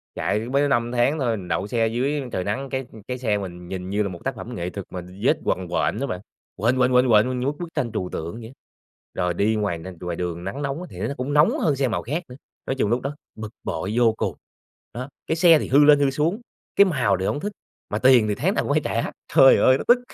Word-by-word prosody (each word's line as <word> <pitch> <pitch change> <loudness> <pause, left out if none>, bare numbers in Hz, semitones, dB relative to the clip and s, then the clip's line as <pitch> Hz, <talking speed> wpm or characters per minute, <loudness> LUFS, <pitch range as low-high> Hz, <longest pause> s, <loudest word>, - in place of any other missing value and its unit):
Chạy 105 - 0
mới 130 +6 0
có - - +2
5 120 -3 +1
tháng 125 +5 +1
thôi, 115 -4 0
mình 90 -2 -8
đậu 85 +4 -1
xe 115 0 +1
dưới 135 +6 -1
trời 90 - -2
nắng, 130 +8 -3
cái 130 -2 -3 0.2
cái 125 - -3
xe 110 -5 0
mình 90 -3 -7
nhìn 90 0 -5
như 105 +2 +1
là 100 - -2
một 85 -2 -8
tác - - -2
phẩm - - -7
nghệ 90 0 -3
thuật 100 0 -7
mà 90 - -6 0.2
vết - - +4
quằn 90 -1 -1
quện 85 +4 0
đó 140 - -2
bạn. 90 +1 -4 0.3
Quện, 120 +6 +1
quện, 125 0 +3
quện, 125 0 +4
quện 120 +4 +4
như 125 - -2
bức 145 - -2
bức 170 -1 -6
tranh 120 - -1
trừu 95 -4 -3
tượng 85 +5 -5
vậy 115 -1 -8
á. 125 - -14 0.6
Rồi 90 -1 0
đi 105 +5 +1
ngoài 105 -5 -1
n 80 - -11 0.2
ngoài 90 -1 -3
đường, 85 0 -4
nắng 110 +10 -5
nóng 140 +3 -3
thì - - -10
n - - -1
nó - - -3
cũng 130 +3 -3
nóng 150 +2 +4
hơn 150 -4 +2
xe 135 -1 +1
màu 110 - -1
khác 155 +9 -3
nữa. 125 - -9 0.3
Nói 135 - -2
chung 120 -6 0
lúc 120 +2 +1
đó 140 +2 -4 0.2
bực 110 -1 -6
bội 100 - -3
vô 115 -2 +4
cùng. - - -2 0.6
Đó, 130 +4 -6 0.2
cái 160 - +1
xe 165 -2 +6
thì - - -4
hư 145 +3 +5
lên, 145 -1 +7
hư 140 -1 +3
xuống, 165 - 0 0.3
cái 200 - +7
màu 125 - +1
thì 95 - -2
hổng 145 - -1
thích, 205 +6 -3 0.4
mà - - -2
tiền 125 -4 +5
thì 105 - 0
tháng - - 0
nào - - 0
cũng - - 0
phải - - +2
trả. - - -1 0.2
Trời 135 - +8
ơi, 130 - +5
nó - - -5
tức! 245 +1 +6
120 Hz, 275 wpm, -23 LUFS, 100-140 Hz, 0.6 s, Trời